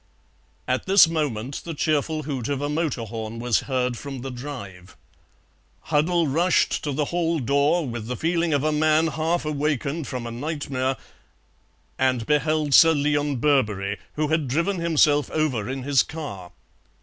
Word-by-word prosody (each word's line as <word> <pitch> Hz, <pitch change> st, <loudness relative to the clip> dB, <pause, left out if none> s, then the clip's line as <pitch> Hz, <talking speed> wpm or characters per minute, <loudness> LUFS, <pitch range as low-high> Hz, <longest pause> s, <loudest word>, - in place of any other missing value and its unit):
At 130 Hz, +6 st, -1 dB
this 190 Hz, -3 st, +7 dB
moment 140 Hz, -6 st, -2 dB
the 165 Hz, -2 st, -6 dB
cheerful 155 Hz, +1 st, 0 dB
hoot 135 Hz, -5 st, -4 dB
of 140 Hz, -2 st, -1 dB
a 145 Hz, +1 st, -2 dB
motor 150 Hz, -6 st, -1 dB
horn 110 Hz, 0 st, -6 dB
was 120 Hz, -2 st, +1 dB
heard 125 Hz, -2 st, 0 dB
from 135 Hz, -1 st, -7 dB
the 135 Hz, +1 st, -5 dB
drive. 120 Hz, -9 st, -9 dB, 0.9 s
Huddle 165 Hz, +3 st, +2 dB
rushed 170 Hz, +6 st, +1 dB
to 150 Hz, -, -2 dB
the 145 Hz, +2 st, -1 dB
hall 170 Hz, -1 st, +1 dB
door 140 Hz, +5 st, +2 dB
with 115 Hz, -2 st, -5 dB
the 125 Hz, 0 st, -3 dB
feeling 170 Hz, +2 st, 0 dB
of 145 Hz, -2 st, +1 dB
a 155 Hz, -, +1 dB
man 155 Hz, +1 st, +3 dB
half 160 Hz, +2 st, -1 dB
awakened 150 Hz, 0 st, -2 dB
from 125 Hz, -2 st, -5 dB
a 115 Hz, -, -5 dB
nightmare, 135 Hz, 0 st, -2 dB, 1.0 s
and 130 Hz, -3 st, +1 dB
beheld 150 Hz, +1 st, +1 dB
Sir 165 Hz, +2 st, +8 dB
Leon 145 Hz, -1 st, 0 dB
Birberry, 110 Hz, -8 st, +1 dB, 0.2 s
who 150 Hz, 0 st, -1 dB
had 160 Hz, -3 st, +1 dB
driven 170 Hz, +8 st, 0 dB
himself 150 Hz, -3 st, +3 dB
over 130 Hz, -9 st, -1 dB
in 130 Hz, 0 st, -4 dB
his 140 Hz, -1 st, +3 dB
car. 115 Hz, -, -7 dB
145 Hz, 160 wpm, -24 LUFS, 125-155 Hz, 1.0 s, Sir